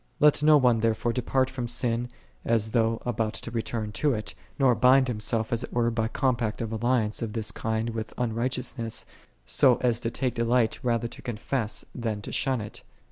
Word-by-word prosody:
2 - - +3
Let 150 -1 +5
no 150 0 +7
one 125 -4 +3
therefore 115 +1 +1
depart 130 +1 +1
from 125 -2 -4
sin 120 0 -1 0.3
as 110 -2 +1
though 115 -1 +2
about 115 -3 -1
to 115 - -6
return 115 -2 -3
to 140 +5 +1
it, 110 - -5 0.2
nor 135 -3 +4
bind 130 +2 +5
himself 110 0 -1
as 115 - 0
it - - -7
were 120 -1 +1
by 110 -1 0
compact 120 -3 0
of 115 -2 -3
alliance 115 -1 0
of 110 -2 -3
this 110 -2 -2
kind 110 +1 -2
with 110 -1 -5
unrighteousness, 120 0 -2 0.4
so 130 -4 +4
as 120 -2 +2
to 115 - -2
take 125 0 -1
delight 115 -1 +1
rather 120 -1 0
to - - -12
confess 120 -1 -2
it - - -25
than 110 -4 -3
to - - -6
shun 130 -4 0
it. 105 - -8
115 Hz, 195 wpm, -27 LUFS, 110-125 Hz, 0.4 s, no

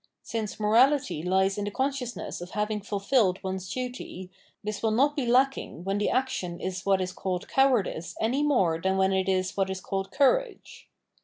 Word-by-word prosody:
Since 220 -3 -4
morality 225 - +3
lies 190 +3 +1
in 205 - -2
the - - -2
consciousness 260 -3 -3
of 175 - -7
having 210 +1 -2
fulfilled 200 -1 +1
one's 190 -1 -4
duty, 245 -7 -6 0.3
this 210 0 -4
will 225 - +2
not 275 +7 +2
be 270 -5 -1
lacking 255 - +1
when 195 +2 -1
the 210 - +1
action 255 -10 -1
is 185 0 -4
what 195 -1 +3
is 185 0 -3
called 185 -1 -3
cowardice 245 -11 +1
any 250 +6 +1
more 190 - +2
than 190 +1 +1
when 190 0 +3
it 190 0 +1
is 185 -1 0
what 195 -1 0
is 190 0 -3
called 195 0 -3
courage. 440 - 0
205 Hz, 180 wpm, -27 LUFS, 190-255 Hz, 0.3 s, morality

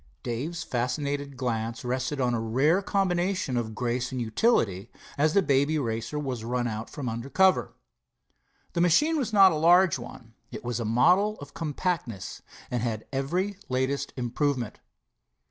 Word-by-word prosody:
Dave's 155 +8 -3
fascinated 140 +3 -2
glance 115 -2 -2
rested 130 +3 -2
on 125 -2 +1
a 115 - 0
rare 135 - +2
combination 185 -6 0
of 110 -2 -2
grace 125 +1 -1
and 130 - -3
utility, 110 - +1 0.3
as 150 +2 +2
the 200 - +5
Baby 140 +1 +2
Racer 115 +1 -2
was 130 -6 -3
run 120 +1 -1
out 110 -1 -4
from 140 -5 -6
under 115 +3 -4
cover. 190 +4 +3 1.0
The 170 - +1
machine 295 - +4
was 245 -5 -2
not 195 -3 +7
a - - -1
large 170 0 +5
one. 120 -1 -11 0.2
It - - -7
was 120 -1 -2
a 115 - -2
model 180 - +3
of 145 0 -10
compactness, 155 - -3 0.3
and 120 -2 -1
had 110 -2 -3
every 180 +9 -1
latest 135 +2 -1
improvement. 125 -1 -1
135 Hz, 155 wpm, -27 LUFS, 120-170 Hz, 1.0 s, not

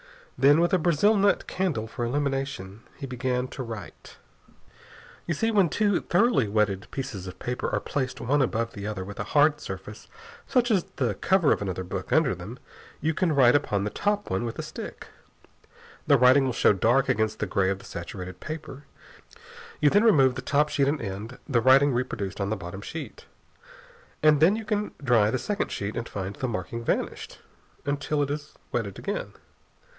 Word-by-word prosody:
Then, 145 +3 +5
with 175 +3 +2
a 185 - +4
brazil 175 +6 +3
nut 200 0 +2
candle 175 -13 -1
for 115 +2 -5
illumination, 135 -6 -2 0.2
he 140 - -6
began 125 0 -2
to - - -7
write. 115 -6 -9 1.1
You 170 - 0
see, 225 +8 +1
when 200 -6 +4
two 205 -1 +1
thoroughly 200 - +2
wetted 100 -1 0
pieces 105 -9 -5
of 90 - -8
paper 125 0 -3
are - - 0
placed 130 -3 -3
one 145 +4 +1
above 115 -2 -1
the 100 0 -6
other 100 -4 -4
with 100 +1 -9
a - - -1
hard 150 +1 +5
surface - - -8 0.4
such 245 -2 +2
as 190 -5 +2
the 125 -7 0
cover 175 - +2
of - - +1
another 95 -2 -3
book 90 - -6
under - - +3
them, - - -8 0.4
you 160 +2 0
can 165 -1 +1
write 125 -3 +6
upon 105 -9 +1
the 105 - -2
top 205 0 -1
one 95 +4 0
with 115 -1 -4
a - - -4
stick. - - -8 1.0
The 140 - +6
writing 130 +2 +6
will 130 - -1
show 115 - +4
dark 120 +7 +2
against 110 -4 0
the - - -1
gray 95 -1 +1
of 95 - -1
the - - -15
saturated 90 -1 -7
paper. 155 -3 -7 0.9
You 145 -1 +4
then 205 - +4
remove 140 - +5
the - - -5
top 150 +1 +2
sheet 140 -2 +1
and 145 +2 0
end 105 +3 -6
the 125 -6 +2
writing 135 +3 +5
reproduced 115 -6 -3
on 100 - -1
the 110 - 0
bottom 95 +1 -7
sheet. 160 +9 -8 1.0
And 155 -1 +6
then 170 +7 +5
you 220 0 -5
can 210 -1 -2
dry 115 -6 +4
the 130 - 0
second 205 - -2
sheet 105 +1 -4
and 120 - -4
find 100 0 -5
the 130 - -3
marking 115 +1 -4
vanished - - -2 0.5
until 145 +1 0
it 140 - -3
is 150 +1 -6 0.2
wetted 105 -5 -2
again. - - -4
130 Hz, 190 wpm, -26 LUFS, 110-155 Hz, 1.1 s, write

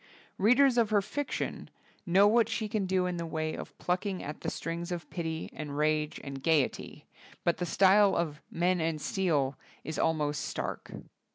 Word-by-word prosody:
Readers 250 +5 +5
of 225 -3 +3
her 210 -1 +4
fiction 285 +8 -4 0.4
know 190 +4 +6
what 230 +1 +4
she 220 0 -2
can 205 -2 -1
do 185 -1 +1
in 180 -1 -2
the 170 - -3
way 155 -1 -2
of - - -8
plucking 185 +1 -2
at 150 - -7
the - - -2
strings 170 +2 -4
of 175 -1 -4
pity 160 -2 -3
and 145 -2 -6
rage 150 0 +1
and 140 -1 -6
gayety; 155 -3 0 0.4
but 170 - +2
the 175 - -2
style 195 +3 +5
of 155 -3 -2
"Men 180 +1 +1
and 160 -1 -1
Steel" 150 -8 0 0.2
is 160 +2 -4
al 160 - +3
most 150 -1 -1
stark. - - -4
170 Hz, 180 wpm, -30 LUFS, 155-200 Hz, 0.4 s, know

